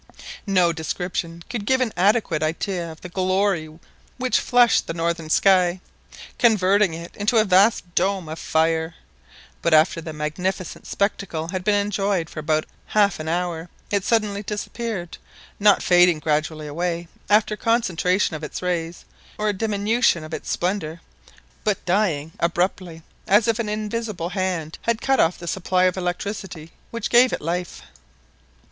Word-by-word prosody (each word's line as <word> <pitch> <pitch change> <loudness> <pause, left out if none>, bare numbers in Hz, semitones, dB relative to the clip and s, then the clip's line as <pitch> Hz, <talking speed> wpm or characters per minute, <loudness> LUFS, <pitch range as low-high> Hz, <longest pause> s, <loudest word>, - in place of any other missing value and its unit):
No 180 -3 +3
description 170 +1 -4
could 235 -4 -4
give 260 +5 +2
an 250 -4 0
adequate 190 -4 +2
idea 170 +2 -2
of 160 - -13
the 180 - -8
glory 185 -2 0 0.5
which 255 -1 +1
flushed 245 -1 +3
the 165 - -4
northern 165 -1 -2
sky, 185 0 +4 0.6
converting 200 -5 +3
it 170 +1 -9
into 210 +3 +1
a 215 - +5
vast 190 -2 +3
dome 190 -1 0
of 160 +1 -6
fire, 160 +1 0 0.7
but 170 -1 +3
after 160 +2 +3
the 160 0 -6
magnificent 165 +5 -4
spectacle 195 -5 -2
had 185 0 -3
been 210 +2 +2
enjoyed 200 -4 0
for - - -6
about 155 0 0 0.2
half 205 -4 +2
an 155 0 -4
hour, 170 -1 -2 0.2
it 200 -2 +1
suddenly 210 -2 +1
disappeared 210 -2 -5 0.4
not 205 -1 +5
fading 175 -2 +5
gradually 155 0 -1
away 170 +3 -3 0.2
after 210 0 +3
concentration 190 -6 +1
of 155 - -7
its 150 - -6
rays, 175 -1 -3 0.3
or 215 0 0
a - - +1
diminution 210 -2 +1
of 155 +1 -9
its - - -5
splendour, 175 -3 -2 0.6
but 210 -3 -1
dying 175 -5 0
abruptly, 170 -1 -1 0.2
as 210 +3 +4
if 230 0 +1
an 220 -2 -2
invisible 215 -4 -3
hand 180 -4 -3
had 230 -1 0
cut 270 +1 +1
off 165 - +3
the 170 - -9
supply 185 +1 0
of 185 0 +3
electricity 180 -2 -4 0.2
which 230 -2 -4
gave 245 +1 +6
it - - -2
life. 175 +2 -4
180 Hz, 155 wpm, -23 LUFS, 165-205 Hz, 0.7 s, gave